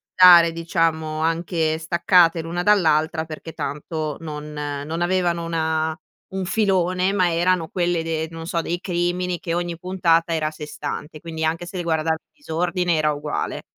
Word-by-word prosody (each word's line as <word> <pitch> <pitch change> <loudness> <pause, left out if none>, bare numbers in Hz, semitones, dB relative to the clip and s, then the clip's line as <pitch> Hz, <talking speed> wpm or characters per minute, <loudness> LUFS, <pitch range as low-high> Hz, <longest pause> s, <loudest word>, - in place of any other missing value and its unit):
dare 175 -2 +8
diciamo 165 -2 -1
anche 165 -1 0
staccate, 170 +1 +3
l'una 170 +2 -3
dall'altra, 160 -5 +3
perché 160 +1 -8
tanto 150 0 -4
non 150 -1 -7
non 150 +2 -4
avevano 175 -1 +1
una 160 -1 -1 0.3
un 190 -1 -3
filone, 185 -2 +1
ma 185 -3 +2
erano 175 -1 +1
quelle 175 -2 0
de 160 -1 -2
non 165 0 -7
so, 170 -1 0
dei 175 +2 -3
crimini, 175 0 -1
che 170 - -3
ogni 175 -1 -2
puntata 170 -2 +1
era 155 -1 0
a - - -3
sé 155 -1 -8
stante, 150 +1 -6
quindi 160 0 -5
anche 165 +2 -1
se 185 - -10
le 175 - -2
guarda 160 -1 +1 0.2
disordine 180 - -1
era 155 -1 +2
uguale. 150 0 -3
165 Hz, 160 wpm, -22 LUFS, 160-175 Hz, 0.3 s, dare